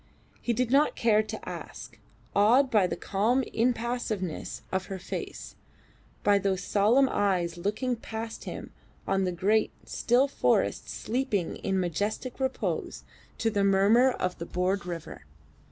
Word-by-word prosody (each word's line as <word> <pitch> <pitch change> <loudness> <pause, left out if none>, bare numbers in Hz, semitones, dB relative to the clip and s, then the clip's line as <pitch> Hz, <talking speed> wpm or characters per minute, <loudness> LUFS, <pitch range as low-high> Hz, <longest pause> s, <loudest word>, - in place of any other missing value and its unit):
He 240 - 0
did 245 +1 0
not 285 +3 +4
care 215 -2 +3
to 215 - -7
ask, - - -8 0.4
awed 240 +7 +5
by 205 -5 +4
the - - -3
calm 230 +7 +1
impassiveness 230 -7 -2
of 190 0 -1
her 195 - -4
face, 180 - -6 0.7
by 205 -1 +4
those 195 -1 -1
solemn 225 +7 +4
eyes 185 -7 0
looking 210 +8 -1
past 225 0 -6
him - - -7 0.4
on 195 0 +1
the 180 - 0
great, 205 +5 +2 0.2
still 250 +4 +2
forests 280 - +1
sleeping 230 -7 -2
in 190 -1 -1
majestic 205 - -2
repose 265 0 -2 0.3
to 225 - 0
the 200 -2 +1
murmur 200 +6 +5
of 185 -7 -2
the 170 - -4
broad 180 +1 -1
river. 170 -3 -6
210 Hz, 140 wpm, -28 LUFS, 190-240 Hz, 0.7 s, awed